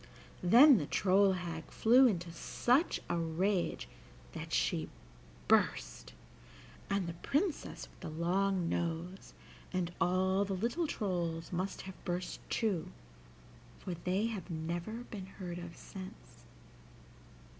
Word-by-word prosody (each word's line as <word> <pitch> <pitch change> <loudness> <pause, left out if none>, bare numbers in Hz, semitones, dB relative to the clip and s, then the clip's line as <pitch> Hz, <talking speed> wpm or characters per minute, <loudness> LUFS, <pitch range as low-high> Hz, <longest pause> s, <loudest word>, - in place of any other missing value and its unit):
Then 245 - +8
the 150 - -1
old - - -16
troll 195 +1 +4
hag 170 -4 -4
flew 250 +4 +6
into 175 -6 -1
such 250 - +1
a 170 - 0
rage 175 +3 0 0.4
that - - -7
she - - +1 0.6
burst, - - +1 0.8
and 200 -2 +1
the 170 - -4
Princess 290 - -2
with - - -22
the - - -6
long 180 +3 +1
nose 170 +3 -3 0.4
and 180 -2 -1
all 190 +2 +3
the 195 -1 -2
little 240 - 0
trolls 170 - -2
must 185 +3 -2
have 190 -1 -10
burst 180 +1 -3
too, 205 - 0 0.9
for 185 - -5
they 180 +5 -1
have 205 -6 -4
never 170 +8 -4
been 195 -4 -6
heard 180 -2 -7
of 175 -1 -9
since. 185 - -11
185 Hz, 125 wpm, -33 LUFS, 170-200 Hz, 0.9 s, Then